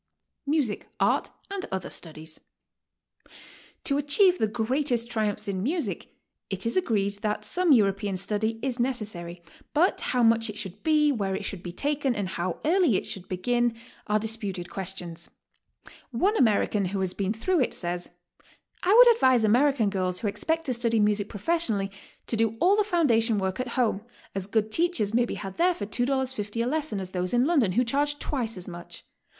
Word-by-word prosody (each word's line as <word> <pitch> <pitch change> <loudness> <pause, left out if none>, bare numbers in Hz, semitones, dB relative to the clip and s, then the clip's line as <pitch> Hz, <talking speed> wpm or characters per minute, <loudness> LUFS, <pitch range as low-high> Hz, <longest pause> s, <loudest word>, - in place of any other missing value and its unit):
MUSIC, 280 -8 0
ART, - - +2 0.2
AND 395 -1 -4
OTHER 190 -2 -4
STUDIES. 160 -1 -4 1.4
To 280 0 +1
achieve 360 +6 +4
the 220 - +2
greatest 240 +2 0
triumphs 210 -3 -1
in 190 -2 -2
music, 310 - -3 0.3
it 195 +1 -4
is 230 - -1
agreed 205 - 0
that 210 0 0
some 360 +6 +2
European 200 -5 +3
study 220 +4 +1
is 260 -2 -2
necessary, 205 -9 -3 0.3
but 345 +6 +3
how 250 -1 +1
much 225 0 +3
it 210 - -6
should 205 -1 -7
be, 305 -2 +3
where 200 -7 -1
it 200 - -4
should 190 -2 -5
be 175 - -6
taken, 280 +4 -1
and 200 -3 -2
how 175 -1 -3
early 335 - +3
it - - -4
should 190 -2 -5
begin 240 +5 0 0.3
are 210 0 +2
disputed 205 -5 -3
questions. 180 -3 -5 0.8
One 375 - +1
American 210 - +2
who 195 +2 -2
has 185 -1 0
been 195 0 -1
through 335 +11 0
it, 255 - +1
says: 175 0 -3 0.7
'T 370 - +2
would 480 +3 +9
advise 260 - +3
American 240 0 +3
girls 185 -2 -1
wtho 215 - 0
ex - - -6
pect 325 0 0
to 260 - 0
study 230 -1 +1
music 210 -1 +1
professionally, 215 - 0 0.3
to - - -2
do 225 0 0
all 380 +3 +5
the 425 - +3
foundation 245 - +2
work 190 +1 -2
at 255 - -2
home; 225 -5 +1 0.3
as 195 -1 -3
good 215 0 0
teachers 290 - +1
may 240 +1 +3
be - - -5
had 195 -2 -7
there 355 +1 +3
for 205 - -4
$2.50 245 -2 -1
a - - -1
lesson 300 -6 -1
as 185 -1 -5
those 180 +4 -1
in 245 +3 +3
I.ondon 260 - +2
who 250 - +4
charge 290 +4 0
twice 240 -8 -3
as 180 - -6
much. 175 -1 -9
225 Hz, 180 wpm, -26 LUFS, 195-275 Hz, 1.4 s, would